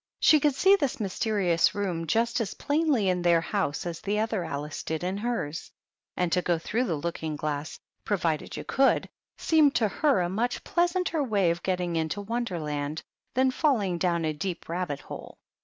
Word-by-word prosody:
She 305 - +6
could 290 -1 +2
see 385 +6 +6
this 280 -11 -1
mysterious 195 -3 +1
room 180 -5 -2
just 235 +7 +1
as 205 - -3
plainly 290 -8 +1
in 180 -1 +1
their 170 -1 +4
house 165 -4 -2
as 170 -1 -5
the 205 +1 -1
other 220 -3 0
Alice 150 -2 -4
did 160 +1 -3
in 185 +2 -1
hers; 205 -9 -3 0.5
and 180 -2 0
to 180 - +2
go 175 -1 +1
through 225 +9 -1
the 170 - -1
looking 160 0 -3
glass, 150 +1 -3 0.3
pro 205 - 0
vided 160 -4 -2
you - - -5
could, 270 0 +2 0.3
seemed 305 -4 +4
to 230 -2 +3
her 275 +1 +2
a 175 - +1
much 225 +7 -2
pleasanter 350 -3 +1
way 200 -8 +2
of 170 +1 -3
getting 180 -2 -1
into 160 +4 -1
Wonderland 160 -10 -3 0.3
than 260 +1 +3
falling 215 - +1
down 170 -2 +1
a 155 - 0
deep 175 +3 -4
rabbit 165 -5 -3
hole. - - -9
185 Hz, 185 wpm, -27 LUFS, 165-240 Hz, 0.5 s, She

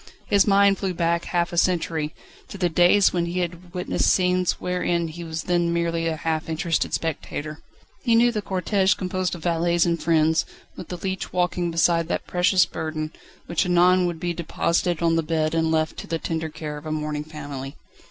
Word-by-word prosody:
His 200 -1 +3
mind 200 -1 +4
flew 190 -2 -2
back 170 0 0
half 175 0 -1
a - - -4
century, 165 -4 0 0.3
to - - -9
the 180 -2 +1
days 175 +4 +4
when 170 -1 0
he 180 +1 -1
had 175 0 -5
witnessed 180 0 0
scenes 180 -1 +2
wherein 175 -2 -1
he 170 +2 -8
was 160 -1 -4
then 175 -1 +1
merely 170 -1 0
a 160 - -1
half 160 +1 -2
interested 165 +1 0
spectator. 155 -1 -4 0.4
He 235 -3 +3
knew 240 +1 +5
the 215 -3 -2
cortège 195 +1 +1
composed 185 -1 -2
of 170 - -10
valets 170 0 +2
and 170 -1 0
friends, 160 0 +3 0.3
with 175 - -8
the 180 - -5
leech 190 +1 -4
walking 180 -1 0
beside 165 0 +2
that - - -2
precious 180 0 +3
burden, 155 -1 -4 0.3
which 170 - 0
anon 180 +1 +4
would 170 -2 -4
be 175 0 -2
deposited 170 0 -1
on 165 0 +3
the - - +3
bed 155 -1 -1
and 165 0 +1
left 160 0 0
to - - -7
the 165 - -1
tender 160 0 -3
care 150 -1 -6
of 150 - -9
a - - -3
mourning 150 -1 -2
family. 145 -3 -7
170 Hz, 195 wpm, -24 LUFS, 160-180 Hz, 0.4 s, knew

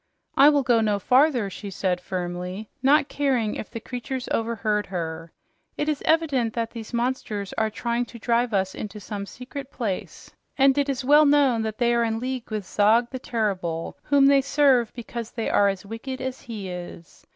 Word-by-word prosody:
"I 280 +2 +8
will 290 -2 +3
go 240 -3 +3
no 210 -2 +1
farther," 255 +1 +3
she 205 - -7
said 180 -1 -1
firmly, 180 +3 -5
not 280 +2 +4
caring 260 -8 0
if - - -6
the 230 - -7
monsters 250 +1 -4
overheard 215 -2 0
her. 165 -2 -5 0.5
"It 295 - -1
is 300 -2 -1
evident 285 -8 +2
that 230 -1 -2
these 225 -2 -8
monsters 235 -5 -2
are 220 0 0
trying 235 +2 -2
to 240 - -12
drive 235 +1 +1
us 190 -2 0
into 210 0 -7
some 200 0 -6
secret 260 +4 -8
place, 215 -9 -5 0.3
and 270 -1 +5
it 285 -1 +1
is 265 -1 -2
well 295 +2 +6
known 280 -5 +4
that 220 -1 -3
they 240 -1 +2
are 235 0 +2
in 225 -1 0
league 255 0 -4
with 215 -3 -3
Zog 225 +5 +3
the 260 - -5
Terrible, 185 -9 -2
whom 280 -1 +4
they 275 0 +6
serve 270 -4 +3
because 235 -1 -6
they 230 -2 -3
are 200 - +4
as 195 0 -2
wicked 230 +5 -6
as 260 0 -4
he 215 -5 -7
is. 175 -2 -9
235 Hz, 190 wpm, -24 LUFS, 205-260 Hz, 0.5 s, I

